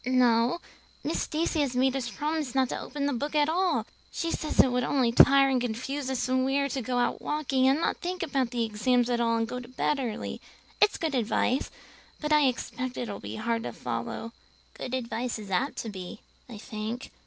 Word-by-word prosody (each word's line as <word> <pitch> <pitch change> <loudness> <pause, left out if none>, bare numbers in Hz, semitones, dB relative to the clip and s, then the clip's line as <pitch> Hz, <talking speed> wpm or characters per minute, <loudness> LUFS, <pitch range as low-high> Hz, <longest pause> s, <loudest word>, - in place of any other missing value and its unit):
"No; 245 +3 +3 0.4
Miss - - -1
Stacy 320 +1 -1
has 265 -3 -1
made 260 +1 +3
us 250 -3 -2
promise 300 -2 -2
not 260 -2 +3
to - - -3
open 285 -1 -3
a 285 - 0
book 290 +5 -3
at 295 -1 +4
all. 360 +3 +1 0.3
She 335 -1 -2
says 305 - -3
it 260 - +7
would 250 0 +1
only 250 -2 +2
tire 275 +3 +7
and 260 -2 +2
confuse 255 +4 -3
us 260 -1 -1
and 255 0 +2
we 270 +1 +1
are 280 0 +1
to 265 0 -2
go 245 +1 -2
out 245 - +1
walking 270 -3 +1
and 270 +3 +4
not 335 - 0
think 365 0 -3
about 275 -6 0
the 235 -1 0
exams 240 +3 +1
at 240 0 +1
all 230 -1 +2
and 225 0 0
go 250 +2 -4
to 245 - -10
bed 265 +3 0
early. 235 -5 -4 0.4
It's 415 - +5
good 320 -3 -2
advice, 250 +1 +1 0.5
but 300 0 0
I 300 -1 +5
expect 250 0 -3
it 240 - -3
will 200 - -5
be 105 +2 -6
hard 230 - -1
to - - -5
follow; 230 - -4 0.4
good 255 - -4
advice 240 -1 -2
is 205 -3 -9
apt 255 +10 0
to 225 - -5
be, 190 +1 -8 0.3
I 230 - -8
think. 215 +4 -5
255 Hz, 220 wpm, -28 LUFS, 235-280 Hz, 0.5 s, it